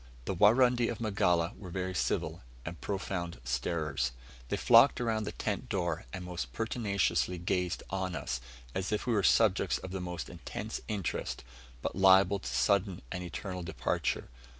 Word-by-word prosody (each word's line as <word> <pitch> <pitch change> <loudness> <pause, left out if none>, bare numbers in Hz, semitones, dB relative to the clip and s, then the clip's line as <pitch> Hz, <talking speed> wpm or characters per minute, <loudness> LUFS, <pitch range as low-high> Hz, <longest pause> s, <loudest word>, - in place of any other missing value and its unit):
The - - -1
Warundi 120 +5 +5
of 115 - -4
Magala 90 -6 +2
were 95 - -9
very 95 +1 -3
civil, - - -1 0.2
and 85 +1 -6
profound 95 -6 -3
starers. 65 0 -1 0.4
They - - 0
flocked 120 +3 +6
around 110 -3 0
the - - -3
tent - - -3
door, 85 -4 -1
and 90 -1 -6
most 85 -9 -4
pertinaciously 100 - 0
gazed 90 0 -1
on 95 -2 -2
us, 65 -4 -3 0.3
as 95 +2 -2
if 105 - -1
we 120 - +1
were 105 - +3
subjects 90 - +4
of 95 - -8
most 90 -3 -4
intense 95 +5 -6
interest, 100 -9 -3 0.4
but - - -2
liable 95 +1 +6
to 95 - -6
sudden 95 +9 +1
and 90 - -3
eternal 90 +2 -5
departure. 85 - -1
95 Hz, 155 wpm, -31 LUFS, 85-105 Hz, 0.4 s, flocked